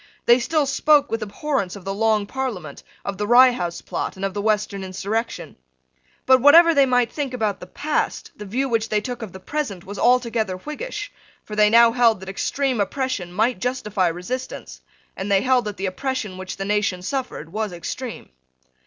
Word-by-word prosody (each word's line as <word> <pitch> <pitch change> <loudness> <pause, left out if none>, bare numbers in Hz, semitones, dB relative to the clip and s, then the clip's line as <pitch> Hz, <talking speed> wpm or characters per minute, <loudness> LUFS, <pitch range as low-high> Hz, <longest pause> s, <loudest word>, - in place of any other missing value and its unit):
They 240 +1 +6
still 305 +4 +1
spoke 290 +1 +3
with 225 0 -1
abhorrence 215 -1 -2
of 195 -2 -11
the 195 - -2
Long 215 0 +1
Parliament, 205 - -5 0.2
of 200 0 -4
the 210 - -1
Rye 250 +2 +7
House 175 -8 -4
Plot, - - -4
and 190 +1 -3
of 195 - -3
the 205 - -3
Western 210 -2 0
insurrection. 200 +5 -4 0.7
But, 260 -1 +5
whatever 335 +5 +8
they 280 -3 +4
might 245 -2 +2
think 275 -4 -3
about 215 -4 -1
the 180 - -10
past, 300 +11 -2
the 210 - -9
view 260 +7 -1
which 225 -3 0
they 210 - +2
took 245 +2 -6
of 220 -4 -6
the 190 - -10
present 205 -6 -4
was 200 +1 -7
altogether 235 -6 +2
Whiggish: 410 - -6 0.3
for 210 - -8
they 210 0 +5
now 230 +1 +6
held 230 -3 +3
that 190 - -8
extreme 255 +4 -1
oppression 255 -5 -2
might 220 +3 +1
justify 210 -7 0
resistance, 180 +10 -5 0.3
and 195 +2 -4
they 195 -1 +4
held 255 -2 +2
that 210 -2 -5
the 195 - -3
oppression 215 0 -3
which 185 0 -6
the 195 - -4
nation 200 -3 0
suffered 245 - -4
was 215 -1 -2
extreme. 225 +8 -6
220 Hz, 190 wpm, -22 LUFS, 195-260 Hz, 0.7 s, whatever